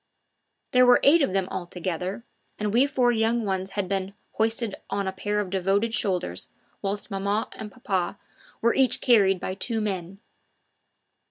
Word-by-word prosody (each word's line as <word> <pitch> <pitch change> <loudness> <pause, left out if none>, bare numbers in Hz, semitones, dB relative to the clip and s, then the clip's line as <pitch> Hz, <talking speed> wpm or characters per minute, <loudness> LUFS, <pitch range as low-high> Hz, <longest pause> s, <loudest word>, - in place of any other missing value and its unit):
There 250 0 +5
were 245 0 +6
eight 315 +4 +6
of 275 - +2
them 190 -1 0
altogether, 180 +2 -4 0.3
and 210 -1 -2
we 255 +4 +5
four 250 -3 +2
young 225 0 +1
ones 190 -1 -2
had 200 - +1
each - - -12
been 195 0 -2 0.2
hoisted 225 -1 0 0.2
on 200 -1 -1
a - - 0
pair 205 +2 -2
of 195 -3 -3
devoted 195 +4 +1
shoulders, 180 - -2 0.3
whilst 200 +2 -3
maman 200 +2 0
and 210 -1 -8
papa 195 -6 -2 0.5
were 235 - +4
each 265 -2 +2
carried 200 -6 +4
by 185 - -3
two 225 +4 -2
men. 195 -3 -3
200 Hz, 165 wpm, -25 LUFS, 190-230 Hz, 0.5 s, were